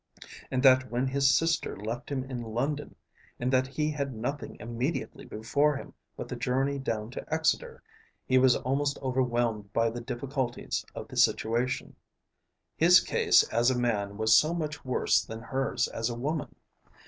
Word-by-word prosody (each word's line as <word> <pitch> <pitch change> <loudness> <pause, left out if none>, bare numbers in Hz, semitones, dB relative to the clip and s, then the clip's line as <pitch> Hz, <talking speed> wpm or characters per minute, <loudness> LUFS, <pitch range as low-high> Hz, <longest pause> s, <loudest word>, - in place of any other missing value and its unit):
And 130 0 -1
that 130 -1 +6
when 125 +2 0
his 135 0 +3
sister 165 0 0
left 115 +5 -5
him 135 -2 -1
in 130 -2 -5
London, 130 +6 -3 0.4
and 125 +2 -1
that 130 0 +3
he 150 +3 -1
had 140 -4 -3
nothing 135 +6 -4
immediately 120 +7 -3
before 145 +7 +1
him - - -10 0.2
but - - -5
the - - -5
journey 135 +2 0
down 110 -4 -3
to 130 - -8
Exeter, 160 - 0 0.4
he 130 0 +4
was 130 -1 +5
almost 140 +2 -1
overwhelmed 120 -5 0
by 115 0 +2
the 120 +1 -6
difficulties 130 +2 -3
of - - -6
the - - -9
situation. 120 +3 +1 0.8
His 175 +3 +7
case - - +4
as 120 +2 +3
a 130 - +1
man 105 -5 -1
was 110 +1 +4
so 155 +3 +4
much 150 -3 -4
worse 130 -1 +2
than 110 0 -8
hers 135 +3 -1
as 115 +1 -2
a 120 - -4
woman. 145 +4 -3
130 Hz, 165 wpm, -28 LUFS, 120-140 Hz, 0.8 s, His